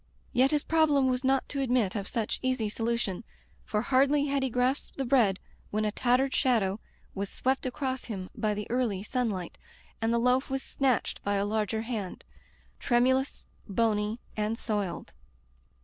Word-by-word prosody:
Yet 260 Hz, +1 st, +4 dB
his 295 Hz, -1 st, +1 dB
problem 310 Hz, -4 st, +3 dB
was 255 Hz, +1 st, 0 dB
not 265 Hz, 0 st, +2 dB
to 275 Hz, -, -2 dB
admit 245 Hz, -7 st, +2 dB
of 200 Hz, -2 st, -3 dB
such 225 Hz, -3 st, -2 dB
easy 255 Hz, -4 st, 0 dB
solution, 225 Hz, -2 st, -2 dB, 0.4 s
for 210 Hz, 0 st, -1 dB
hardly 275 Hz, +3 st, +3 dB
had 280 Hz, -1 st, 0 dB
he 265 Hz, -, 0 dB
grasped 250 Hz, +3 st, 0 dB
the 270 Hz, -, -1 dB
bread 235 Hz, -7 st, +3 dB, 0.3 s
when 215 Hz, +1 st, 0 dB
a 210 Hz, -, +1 dB
tattered 255 Hz, +4 st, +2 dB
shadow 220 Hz, -7 st, +2 dB, 0.3 s
was 200 Hz, 0 st, -3 dB
swept 265 Hz, 0 st, -1 dB
across 260 Hz, 0 st, -3 dB
him 195 Hz, -5 st, -5 dB
by 210 Hz, -1 st, -1 dB
the 210 Hz, 0 st, -4 dB
early 235 Hz, -6 st, 0 dB
sunlight, 215 Hz, -7 st, -2 dB, 0.4 s
and 225 Hz, +1 st, +1 dB
the 235 Hz, -, +3 dB
loaf 250 Hz, +3 st, +2 dB
was 270 Hz, 0 st, -2 dB
snatched 265 Hz, -4 st, 0 dB
by 205 Hz, 0 st, 0 dB
a 200 Hz, 0 st, +1 dB
larger 220 Hz, +1 st, -1 dB
hand 220 Hz, -6 st, -4 dB, 0.3 s
— -, -, -33 dB
trem 240 Hz, -1 st, +3 dB
ulous, 260 Hz, +1 st, 0 dB, 0.2 s
bony, 215 Hz, +1 st, +1 dB, 0.2 s
and 215 Hz, +1 st, -1 dB
soiled. 205 Hz, -6 st, -3 dB
240 Hz, 170 wpm, -29 LUFS, 210-265 Hz, 0.4 s, Yet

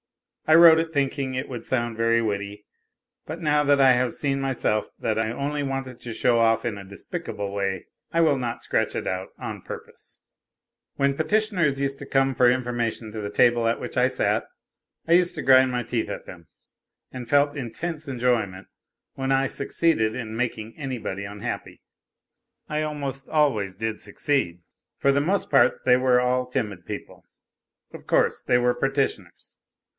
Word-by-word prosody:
I 155 Hz, -, +6 dB
wrote 165 Hz, -1 st, +9 dB
it 165 Hz, 0 st, -2 dB
thinking 140 Hz, -2 st, -1 dB
it 130 Hz, +2 st, -3 dB
would 120 Hz, -3 st, -7 dB
sound 120 Hz, -3 st, -1 dB
very 115 Hz, +1 st, +2 dB
witty; 105 Hz, -1 st, -4 dB, 0.6 s
but 160 Hz, +2 st, -6 dB
now 150 Hz, -3 st, +2 dB
that 145 Hz, -1 st, +3 dB
I 135 Hz, -1 st, +7 dB
have 125 Hz, -1 st, +2 dB
seen 135 Hz, -1 st, -1 dB
myself 130 Hz, -5 st, 0 dB
that 110 Hz, -1 st, -1 dB
I 110 Hz, 0 st, 0 dB
only 145 Hz, +4 st, -2 dB
wanted 135 Hz, -2 st, -4 dB
to 120 Hz, -, -7 dB
show 115 Hz, +1 st, +2 dB
off 115 Hz, 0 st, +3 dB
in 115 Hz, -4 st, -2 dB
a 100 Hz, -, -8 dB
despicable 100 Hz, -, -6 dB
way, 95 Hz, -2 st, -2 dB, 0.3 s
I 165 Hz, -, +1 dB
will 155 Hz, -4 st, +4 dB
not 120 Hz, -2 st, -4 dB
scratch -, -, 0 dB
it -, -, -3 dB
out 95 Hz, +1 st, -3 dB
on -, -, -6 dB
purpose -, -, -11 dB, 0.4 s
!) -, -, -63 dB
When 140 Hz, 0 st, +2 dB
petitioners 170 Hz, -4 st, +1 dB
used 140 Hz, 0 st, -1 dB
to 140 Hz, -, -7 dB
come 135 Hz, 0 st, +2 dB
for 125 Hz, -1 st, +5 dB
information 120 Hz, -3 st, -2 dB
to 110 Hz, -, -5 dB
the 100 Hz, -, -4 dB
table 120 Hz, +2 st, +3 dB
at 115 Hz, -, 0 dB
which -, -, -7 dB
I -, -, +4 dB
sat, -, -, 0 dB, 0.6 s
I 165 Hz, -, +4 dB
used 175 Hz, 0 st, +3 dB
to 155 Hz, -, -3 dB
grind 130 Hz, -1 st, +5 dB
my 125 Hz, -1 st, -1 dB
teeth 120 Hz, -2 st, -2 dB
at -, -, -6 dB
them, 85 Hz, -3 st, -12 dB, 0.6 s
and 125 Hz, -2 st, -8 dB
felt 145 Hz, +1 st, +3 dB
intense 150 Hz, +5 st, -5 dB
enjoyment 120 Hz, -7 st, -1 dB, 0.5 s
when 135 Hz, 0 st, -2 dB
I 135 Hz, 0 st, +3 dB
succeeded 140 Hz, -7 st, 0 dB
in 110 Hz, -3 st, -5 dB
making 115 Hz, -2 st, -3 dB
anybody 125 Hz, -8 st, -4 dB
unhappy. 100 Hz, +1 st, -6 dB, 0.9 s
I 150 Hz, 0 st, -1 dB
almost 140 Hz, -3 st, -4 dB
always 120 Hz, -12 st, +1 dB
did 110 Hz, +1 st, -3 dB
succeed. 90 Hz, -, -1 dB, 0.3 s
For 140 Hz, -, +3 dB
the 140 Hz, -, +2 dB
most 190 Hz, +7 st, 0 dB
part 120 Hz, -, +3 dB
they 125 Hz, -, +6 dB
were 125 Hz, -1 st, +3 dB
all 125 Hz, 0 st, +1 dB
timid 105 Hz, -8 st, -4 dB
people -, -, -8 dB, 0.7 s
of -, -, -11 dB
course, -, -, +2 dB
they -, -, +1 dB
w 125 Hz, 0 st, +3 dB
r -, -, +3 dB
ere 135 Hz, +2 st, 0 dB
petitioners. 120 Hz, -10 st, -3 dB
125 Hz, 180 wpm, -24 LUFS, 110-140 Hz, 0.9 s, wrote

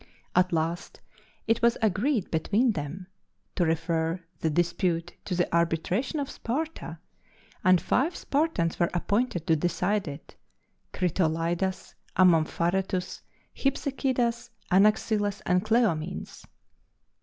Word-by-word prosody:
At 180 Hz, +1 st, +4 dB
last 165 Hz, +1 st, -2 dB, 0.5 s
it 225 Hz, +1 st, +1 dB
was 235 Hz, 0 st, +3 dB
agreed 220 Hz, +2 st, +1 dB
between 210 Hz, +9 st, +2 dB
them 155 Hz, +2 st, -5 dB, 0.5 s
to 175 Hz, -4 st, +1 dB
refer 165 Hz, +1 st, 0 dB, 0.2 s
the 160 Hz, -, 0 dB
dispute 170 Hz, +1 st, 0 dB
to 185 Hz, -, -2 dB
the 175 Hz, -, +1 dB
arbitration 170 Hz, -, 0 dB
of 280 Hz, -, -2 dB
Sparta, 270 Hz, -, -4 dB, 0.7 s
and 185 Hz, -1 st, +5 dB
five 310 Hz, -, +1 dB
Spartans 280 Hz, -, 0 dB
were 170 Hz, -, +3 dB
appointed 200 Hz, -1 st, 0 dB
to 165 Hz, -3 st, +3 dB
decide 180 Hz, +4 st, 0 dB
it 145 Hz, +1 st, -9 dB, 0.6 s
Critolaidas, 175 Hz, +1 st, -1 dB, 0.2 s
Amompharetus, 180 Hz, +2 st, +2 dB, 0.3 s
Hypsechidas, 260 Hz, -3 st, -1 dB, 0.2 s
Anaxilas, 205 Hz, +1 st, +2 dB
and 180 Hz, +1 st, +2 dB
Cleomenes. 205 Hz, -7 st, -1 dB
185 Hz, 105 wpm, -27 LUFS, 170-225 Hz, 0.7 s, and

